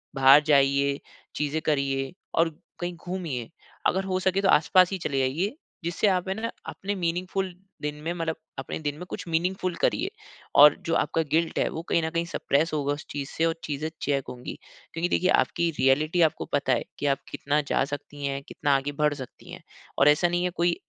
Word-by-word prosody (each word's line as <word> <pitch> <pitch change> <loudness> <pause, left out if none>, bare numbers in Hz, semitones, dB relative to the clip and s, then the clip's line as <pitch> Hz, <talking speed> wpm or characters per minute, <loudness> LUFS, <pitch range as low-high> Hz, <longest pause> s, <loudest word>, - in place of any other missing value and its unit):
बाहर 135 +2 +8
जाइए, 140 -1 +3 0.4
चीज़े 150 +1 -1
करिए 135 -1 0 0.2
और 165 0 +4 0.3
कहीं 175 0 -3
घूमिए। 165 -9 -4 0.4
अगर 190 +1 +1
हो 185 - +1
सके 190 +1 +1
तो 195 - +2
आसपास 180 +5 +5
ही 195 - -1
चले 140 -5 -1
जाइए, 165 - 0 0.3
जिससे 170 +5 +1
आप 185 -1 +1
है 190 - +1
ना 230 +1 -3 0.2
अपने 200 +1 -4
मीनिंगफ़ुल 185 +2 -2 0.3
दिन 150 0 -3
में 170 +2 -1
मतलब 165 -2 -2 0.2
अपने 135 - -4
दिन 145 -2 -2
में 180 - -7
कुछ - - -6
मीनिंगफ़ुल 180 +2 0
करिए। 370 +7 +2 0.5
और 145 +1 +9
जो 165 - +1
आपका 165 +2 +1
गिल्ट 165 +1 +1
है, - - +2
वो 160 - -5
कहीं 170 - +3
न 160 - 0
कहीं 170 +1 -1
सप्रेस 155 -1 0
होगा 145 -1 0
उस 145 - -7
चीज़ 140 -1 -4
से 165 - 0
और 165 0 +1
चीज़े 150 +1 -3
चेक 140 -2 0
होंगी। 125 0 -7 0.4
क्योंकि 170 +2 -1
देखिए, 185 - +2
आपकी 170 -2 +2
रियलिटी 150 +6 +3
आपको 160 - +2
पता 145 - +2
है - - 0 0.2
कि - - -2
आप 135 - -9
कितना 145 +1 0
जा - - +3
सकती 145 0 -6
हैं, 140 0 -2
कितना 140 0 0
आगे 135 +1 -1
बढ़ 150 -1 +3
सकती 130 -4 -10
हैं। - - -10 0.4
और 140 - +6
ऐसा 150 +4 +4
नहीं 175 +1 0
है, 180 - +1
कोई 175 -1 +1
160 Hz, 205 wpm, -26 LUFS, 140-175 Hz, 0.5 s, और